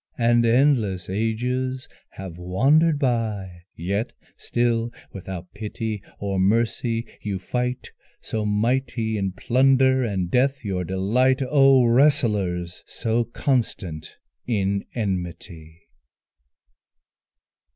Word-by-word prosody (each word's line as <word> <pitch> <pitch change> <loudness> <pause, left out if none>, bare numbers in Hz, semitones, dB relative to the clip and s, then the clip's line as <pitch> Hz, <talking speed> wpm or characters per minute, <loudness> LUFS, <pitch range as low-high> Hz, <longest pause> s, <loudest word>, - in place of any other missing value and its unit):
And 120 0 +3
endless 115 -8 +2
ages 125 +5 -2 0.2
have 95 -3 -9
wandered 140 - +3
by, 110 - -2
Yet 100 +6 -2 0.2
still 120 -1 0 0.2
without 95 -2 -8
pity 110 0 -4 0.2
or 100 -1 -2
mercy 115 +3 +1 0.2
you 100 -2 -3
fight, 125 +6 -3 0.3
So 110 -1 -3
mighty 115 +2 0
in 95 -3 -2
plunder 130 +4 +3
and 95 -6 -2
death 135 0 +1
your 95 -3 -1
delight: 115 +9 +1
Oh 135 -2 +5
wrestlers! 105 - +2
so 115 +1 -1
constant 110 - -2 0.3
in 100 -4 0
enmity! 85 -5 -5
110 Hz, 95 wpm, -23 LUFS, 95-125 Hz, 0.3 s, Oh